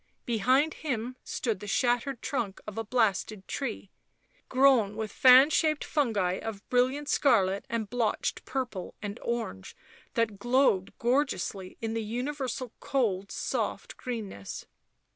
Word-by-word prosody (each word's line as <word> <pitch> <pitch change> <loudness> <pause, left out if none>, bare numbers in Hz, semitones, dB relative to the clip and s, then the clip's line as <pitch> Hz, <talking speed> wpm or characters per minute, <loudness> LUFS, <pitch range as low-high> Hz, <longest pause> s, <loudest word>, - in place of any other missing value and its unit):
Behind 255 +7 +2
him 250 -4 -3
stood 225 -6 -2
the 205 - -8
shattered 245 +3 0
trunk 240 -10 -2
of 210 - -7
a 225 - -2
blasted 215 -3 0
tree, 230 -7 -4 0.6
grown 255 -6 +4
with 220 -1 -4
fan 260 +3 +7
shaped 310 -2 +2
fungi 205 -11 0
of 210 -2 -6
brilliant 260 +4 +2
scarlet 200 -10 +3
and 230 -2 -2
blotched 225 0 -1
purple 250 -8 -4
and 205 +2 -5
orange 230 - -4 0.4
that 220 -4 0
glowed 240 -5 +3
gorgeously 235 -7 -1
in 225 -1 -2
the 225 - -1
universal 250 +2 -3
cold 210 -9 0
soft - - -3
greenness. 215 - -6
235 Hz, 125 wpm, -29 LUFS, 205-260 Hz, 0.6 s, fan